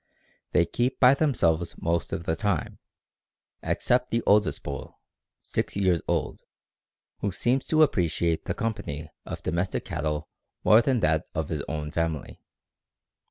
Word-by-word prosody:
They 85 - +4
keep 120 +9 -1
by 125 0 +7
themselves 90 - +1
most 85 0 -1
of 85 - -3
the 80 - 0
time, 100 -6 -2 0.8
except 125 +1 +1
the 115 0 0
oldest 105 -1 +3
bull 70 -2 -7 0.4
(six - - -2
years 95 -4 +2
old), - - -1 0.8
who 100 - -1
seems 120 +8 0
to 155 0 +5
appreciate 85 - +1
the - - -2
company 80 -10 -4 0.2
of - - -6
domestic 85 +3 -1
cattle 75 0 -2 0.4
more 110 +2 +7
than 130 -3 +1
that 80 -2 +1
of 80 -2 -2
his 75 -3 -2
own 75 -1 -4
family. 80 -3 -3
85 Hz, 140 wpm, -27 LUFS, 80-115 Hz, 0.8 s, by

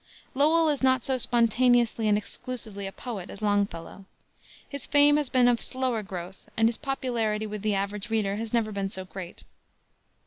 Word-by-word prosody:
Lowell 315 +4 +4
is 295 -3 +1
not 260 -1 +3
so 260 -1 0
spontaneously 235 -1 +3
and 210 -1 +4
exclusively 215 -2 -5
a - - -6
poet 205 -5 -7
as - - -9
Longfellow. 200 -2 -1 0.6
His 280 -2 -7
fame 290 0 +6
has 295 -4 -1
been 250 -1 +4
of 240 -1 +2
slower 255 -3 -1
growth, 185 -1 -8
and 225 0 +5
his 230 - -1
popularity 235 -6 -1
with 210 -1 -5
the 210 -1 0
average 200 +2 -3
reader 210 -3 0
has 225 0 -4
never 230 -3 +1
been 200 -1 -2
so 190 -1 -5
great. 185 -1 -9
225 Hz, 175 wpm, -27 LUFS, 200-255 Hz, 0.6 s, fame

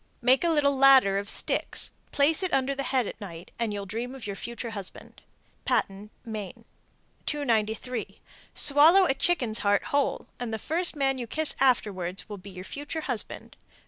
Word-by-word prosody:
Make 255 +4 +4
a 340 - +2
little 290 -3 +2
ladder 265 -8 +6
of 200 +1 -6
sticks, - - -1 0.2
place 295 +4 +2
it 370 -2 -2
under 270 +1 +1
the 275 - -4
head 260 -3 +1
at 210 - -8
night, 170 -3 -9
and 230 -2 -1
you'll 200 -1 -4
dream 235 +6 -5
of 265 - -9
your 200 -1 -4
future 235 +2 -6
husband. 200 -4 -9 0.4
Patten, 200 +2 -1 0.2
Me. 215 -4 -7 0.6
295. 235 -4 -2 0.4
Swallow 315 +7 +6
a 270 - +2
chicken's 265 -6 +2
heart 205 -1 +2
whole, 285 -1 0
and 245 -2 -4
the 220 - -2
first 330 - +1
man 270 -2 0
you 240 - -5
kiss 315 +5 +2
afterwards 200 -8 +1
will 205 -2 -8
be 195 +2 -11
your 185 -1 -9
future 290 +6 -5
husband. 245 -8 -3
245 Hz, 175 wpm, -27 LUFS, 205-280 Hz, 0.6 s, ladder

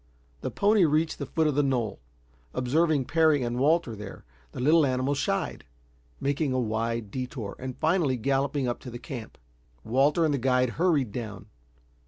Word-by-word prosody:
The - - -2
pony 205 -1 +3
reached 160 +1 +1
the 140 - -4
foot 160 +2 0
of 150 - +2
the 145 - +3
knoll. 125 -7 -1 0.6
Observing 150 +2 +2
Parry 155 -3 +3
and 120 +1 -2
Walter 150 -4 +2
there, 105 -1 -9 0.3
the - - -8
little 155 +5 +5
animal 130 0 +1
shied, 140 - -2 0.6
making 140 0 0
a 130 - +1
wide 115 -1 -2
detour, 125 -4 -5
and 130 -1 -6
finally 160 -5 +1
galloping 135 +2 0
up 120 - -2
to 125 - -9
the 120 - -7
camp. 120 -2 -8 0.5
Walter 140 +8 +3
and 155 - +1
the 140 - 0
guide 125 0 +2
hurried 150 - +1
down. 110 -4 -6
135 Hz, 170 wpm, -27 LUFS, 120-155 Hz, 0.6 s, little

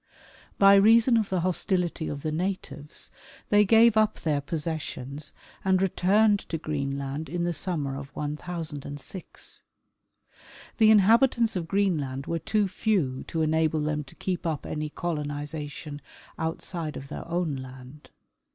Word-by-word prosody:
By 195 0 +7
reason 230 +4 +6
of 220 -3 +1
the 185 -2 0
hostility 180 -2 0
of 140 -1 -5
the 155 - -1
natives 155 -4 -3 0.4
they 210 0 +6
gave 225 +2 +6
up 215 -1 +3
their 150 -3 0
possessions 150 -2 -4 0.3
and 190 -1 +3
returned 200 +3 +3
to 165 - -1
Green 140 -3 -2
land 140 +2 -4
in 175 +2 -2
the 175 0 0
summer 150 -6 -1
of 140 0 -6
1006. 150 +1 -5 1.2
The 220 -1 +7
inhabitants 225 +2 +5
of 170 -3 -2
Greenland 155 -9 0
were 170 - -2
too 210 +2 +1
few 185 -9 0
to 160 -1 -1
enable 155 0 +2
them 150 0 -1
to 135 - -15
keep 180 -2 -3
up 155 -3 -2
any 150 0 -3
colonization 150 -2 -4 0.4
outside 160 -1 -3
of 140 +1 -9
their - - -7
own 170 -4 -1
land. 130 +2 -11
160 Hz, 140 wpm, -27 LUFS, 145-190 Hz, 1.2 s, By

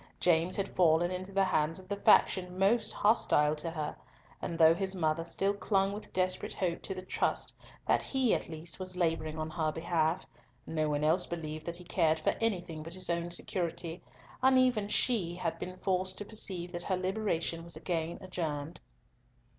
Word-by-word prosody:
James 170 0 +3
had 195 -1 -3
fallen 175 0 +4
into 185 +1 -5
the 195 0 +2
hands 165 -3 +1
of 185 -1 -8
the 200 - -2
faction 185 -2 +3
most 210 +3 +3
hostile 150 -8 +3
to 155 +2 -3
her, 155 -2 -4 0.5
and 170 - -3
though 160 0 +7
his 190 +2 0
mother 160 -2 0
still 195 +4 +1
clung 195 -1 +1
with 210 - -8
desperate 185 0 -1
hope 175 -3 -1
to 190 - -4
the 185 - -6
trust - - -1 0.3
that - - +3
he, 265 -4 +2
at - - -2
least, 160 +2 -5
was 185 -1 -1
labouring 160 -2 0
on 155 0 -3
her 155 -2 0
behalf, 165 +1 0 0.4
no 155 -1 -1
one 145 0 0
else 165 +4 +2
believed 155 -2 -5
that 170 - -2
he 180 - -8
cared 160 -3 +2
for 155 - +1
anything 175 -8 -1
but 165 +3 -8
his 185 -2 -2
own 170 0 -1
security, 170 -1 -2 0.4
and 260 0 +5
even 245 -5 +3
she 205 -5 +1
had 175 -2 -3
been 185 0 -6
forced 185 0 0
to 205 - -5
perceive 185 -5 -1
that 175 - -4
her 185 +1 -1
liberation 185 -4 -1
was 170 0 -4
again 165 -1 -2
adjourned. 165 -4 -4
175 Hz, 185 wpm, -31 LUFS, 160-190 Hz, 0.5 s, though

